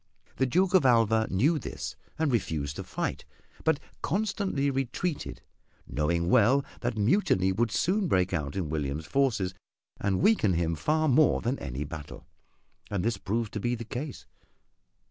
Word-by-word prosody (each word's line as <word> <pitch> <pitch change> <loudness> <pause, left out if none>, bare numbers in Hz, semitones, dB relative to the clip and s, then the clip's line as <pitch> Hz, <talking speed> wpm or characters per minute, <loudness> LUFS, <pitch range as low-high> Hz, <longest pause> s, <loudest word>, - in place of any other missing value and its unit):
The 130 - +2
Duke 180 +8 +2
of 185 - +6
Alva 115 -3 +4
knew 145 - +2
this - - -6 0.2
and 155 -2 +1
refused 75 - -1
to - - -4
fight, - - -3 0.4
but 160 -3 +2 0.2
constantly 190 -6 0
retreated, 135 +5 -3 0.4
knowing 85 +3 0
well 130 +7 +4
that 120 -2 -2
mutiny 105 - +3
would 115 +5 +1
soon 190 - +1
break 95 - +2
out 75 -5 -2
in 90 -6 -2
William's 75 0 -2
forces 115 -9 +1 0.5
and 95 -2 0
weaken 205 - +4
him 85 -1 0
far 155 - +1
more 150 +1 +4
than 125 +4 -2
any 70 0 -4
battle. 75 0 -8 0.6
And 100 -1 -1
this 115 -3 +1
proved 110 +3 -2
to 105 - -2
be 120 +4 0
the 115 0 -7
case. 135 +4 -6
115 Hz, 155 wpm, -28 LUFS, 90-140 Hz, 0.6 s, of